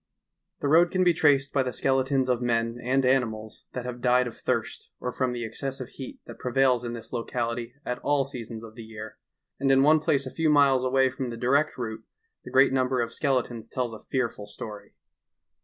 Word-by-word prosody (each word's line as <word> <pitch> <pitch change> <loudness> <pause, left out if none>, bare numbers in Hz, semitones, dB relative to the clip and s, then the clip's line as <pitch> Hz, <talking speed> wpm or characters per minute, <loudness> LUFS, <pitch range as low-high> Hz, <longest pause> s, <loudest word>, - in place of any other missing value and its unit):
The - - 0
road 170 +5 +4
ean 185 - +4
be 175 -1 +5
traeed 145 -3 +3
by 140 - +3
the 130 -1 -1
skeletons 130 +1 +1
of 125 -1 +1
men 115 0 0
and 130 +2 +2
animals 110 -5 0
that 125 -1 -4
have 125 -1 -6
died 125 0 +4
of 120 - -6
thirst - - -3
or 125 - -3
from 130 0 -1
the 120 -1 -4
exeessive 130 +3 -5
heat 135 -1 -9
that - - -11
prevails 125 -1 +2
in 120 -1 -4
this 115 0 -9
loeality 115 0 -3
at 125 0 -3
all 145 -1 +1
seasons 115 -4 -7
of 110 -1 -10
the 115 - -10
year, 110 -1 -9 0.4
and 135 0 +1
in 135 0 +5
one 155 +2 +6
plaee 140 -3 +1
a 130 - -6
few 160 -1 +1
miles 140 -3 +5
away 130 0 +3
from 130 -1 -4
the 115 - -6
direet 140 +6 +2
route 110 -3 -5 0.4
the - - -9
great 135 0 +5
number 130 -1 +1
of 115 -1 -1
skeletons 125 -5 -1
tells 125 -3 -2
a 110 - -8
fearful 120 -6 -2
story. 105 0 -9
125 Hz, 205 wpm, -27 LUFS, 115-135 Hz, 0.4 s, one